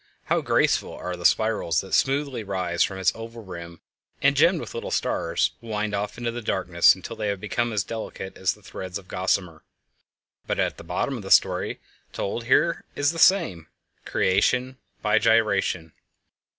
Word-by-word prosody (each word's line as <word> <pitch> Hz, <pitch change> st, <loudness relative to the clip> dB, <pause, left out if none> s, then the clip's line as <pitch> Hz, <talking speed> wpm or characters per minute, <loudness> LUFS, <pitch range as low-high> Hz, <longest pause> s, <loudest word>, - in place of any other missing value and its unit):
How -, -, +1 dB
graceful -, -, +1 dB
are 90 Hz, 0 st, -5 dB
the 85 Hz, 0 st, +4 dB
spirals 110 Hz, -9 st, +1 dB
that 95 Hz, -, -10 dB
smoothly 135 Hz, -3 st, +1 dB
rise 90 Hz, -3 st, -2 dB
from 95 Hz, -, +1 dB
its 95 Hz, -1 st, +2 dB
oval 115 Hz, 0 st, -9 dB
rim 85 Hz, -3 st, -9 dB, 0.4 s
and, -, -, +3 dB
gemmed -, -, +4 dB
with -, -, -7 dB
little -, -, -5 dB
stars, 85 Hz, 0 st, 0 dB
wind 110 Hz, -2 st, -3 dB
off 100 Hz, +1 st, -3 dB
into 120 Hz, -1 st, -2 dB
the 120 Hz, +1 st, -5 dB
darkness 85 Hz, -6 st, +3 dB
until 95 Hz, +5 st, -8 dB
they 110 Hz, -1 st, -3 dB
have 100 Hz, -1 st, -1 dB
become 120 Hz, +4 st, -1 dB
as 105 Hz, -3 st, 0 dB
delicate 110 Hz, -3 st, -6 dB
as 95 Hz, 0 st, 0 dB
threads 95 Hz, -2 st, -7 dB
of 95 Hz, -2 st, -13 dB
gossamer! 90 Hz, -4 st, -1 dB, 0.8 s
But -, -, -1 dB
at -, -, -2 dB
bottom -, -, -2 dB
the -, -, -8 dB
story -, -, +3 dB, 0.3 s
told 115 Hz, +4 st, -3 dB
here 150 Hz, +7 st, +3 dB
is 145 Hz, +1 st, +2 dB
the 165 Hz, -, -6 dB
same—creation 125 Hz, -, +1 dB, 0.2 s
by 105 Hz, 0 st, +3 dB
gyration! 100 Hz, -7 st, +2 dB
100 Hz, 160 wpm, -25 LUFS, 90-115 Hz, 0.8 s, the